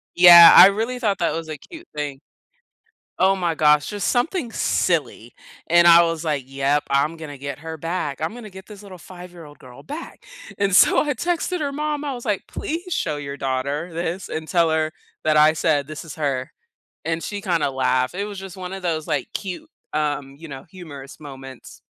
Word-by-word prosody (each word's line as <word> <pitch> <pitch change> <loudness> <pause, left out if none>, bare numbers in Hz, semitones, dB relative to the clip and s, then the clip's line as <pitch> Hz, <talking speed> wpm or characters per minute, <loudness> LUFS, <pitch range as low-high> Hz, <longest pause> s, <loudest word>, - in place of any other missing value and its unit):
Yeah, 175 -1 +10
I - - +11
really 225 +5 -2
thought 205 -5 0
that 170 - 0
was 165 0 -5
a 155 -1 -6
cute 335 - -13
thing. 145 -2 -4 1.0
Oh 190 +1 +4
my 175 -3 -1
gosh, 150 -1 +4
just 205 -2 -3
something 250 0 -1
silly, 155 - -1 0.3
and 170 +1 +5
I 170 0 +8
was 165 -1 -2
like, 145 -4 -2
"Yep, 140 +2 0
I'm 140 +4 +1
gonna 155 -3 -9
get 140 0 -6
her 160 0 -7
back. 160 -3 -4
I'm 160 +6 -2
gonna 235 -3 -10
get 190 0 -12
this 210 -1 -12
little 190 -3 -12
five-year-old 175 -4 -13
girl 125 -1 -14
back." 300 +4 -9 0.3
And 200 -2 0
so - - +6
I 295 -2 -1
texted 350 +6 -2
her 285 -2 -2
mom. 295 0 -3
I 280 - -3
was 245 0 -8
like, 210 -4 -2
"Please 345 +3 -5
show 150 - -2
your 140 -1 -6
daughter 140 +5 -3
this 170 +2 -4
and 160 0 -5
tell 170 -3 +2
her 155 0 0 0.3
that 155 -1 +2
I 155 +1 +5
said 150 -3 0
this 155 +1 -8
is 155 - -9
her." 135 -4 -3 0.5
And 165 0 -2
she 205 +3 -5
kinda 170 -7 0
laughed. 130 0 0
It 200 +2 -3
was 205 -2 -8
just 190 -1 -9
one 185 0 -7
of 195 -1 -7
those, 160 -3 -2
like, 150 -5 -2
cute, 200 - -6 0.2
um, 145 -2 -2
you 165 +3 -11
know, 135 -1 -9
humorous 145 -8 -11
moments. 135 -3 -11
165 Hz, 200 wpm, -22 LUFS, 145-195 Hz, 1.0 s, I